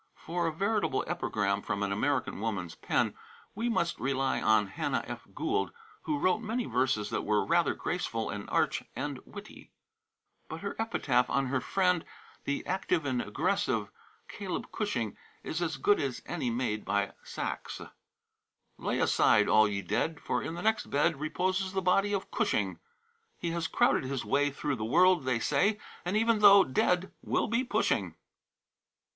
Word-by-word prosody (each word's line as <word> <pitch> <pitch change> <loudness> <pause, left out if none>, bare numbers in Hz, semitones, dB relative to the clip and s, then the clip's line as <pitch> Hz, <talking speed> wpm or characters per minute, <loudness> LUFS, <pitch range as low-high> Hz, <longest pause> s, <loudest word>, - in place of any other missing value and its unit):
For 170 +1 -2
a - - 0
veritable 200 -3 0
epigram 105 - -1
from 100 0 -2
an 100 - -1
American 135 +6 0
woman's 100 -6 -3
pen - - 0 0.4
we 230 +4 -1
must 170 -7 0
rely 135 0 0
on 110 -1 +4
Hannah 140 +8 -2
F. 120 0 -8
Gould, 365 +7 0 0.3
who 300 - 0
wrote 185 -7 +2
many 230 +2 -2
verses 125 -4 0
that - - 0
were 105 -1 +1
rather 170 0 +2
graceful 115 -10 -2
and 105 -1 -6
arch - - +1
than - - -3
witty. - - -11 0.8
But 160 - -6
her 200 - -4
epitaph 130 - +1
on 135 0 +1
her 130 - +1
friend, 180 +3 +1 0.4
the 140 - -2
active 180 -4 0
and 130 -3 0
aggressive - - -1 0.4
Caleb - - -5
Cushing, - - -2 0.3
is 160 - -3
as 165 -2 -1
good 205 - +3
as 135 -3 -3
any 155 -8 -2
made 115 -3 -1
by 100 0 0
Saxe. - - -5 1.0
"Lay - - -1
aside, - - +4
all 110 0 +6
ye 100 -1 -3
dead, 160 - -1
For - - -1
in 165 - -4
the 175 - -6
next 220 +1 +1
bed 150 +1 +2
Reposes 185 +5 -1
the 195 - +1
body 195 +3 +3
of 195 -2 -2
Cushing; - - 0 0.6
He 170 - -3
has 165 -1 -1
crowded - - +2
his 130 -3 -3
way 140 +6 +2
Through 140 0 -3
the 110 - -4
world, 175 +6 +4
they 130 -2 +2
say, 205 - +2 0.3
And 180 +4 0
even 225 0 +3
though 200 -1 +9
dead 180 +7 +1
will - - 0
be 235 +2 +1
pushing." 250 - 0
160 Hz, 165 wpm, -30 LUFS, 125-190 Hz, 1.0 s, though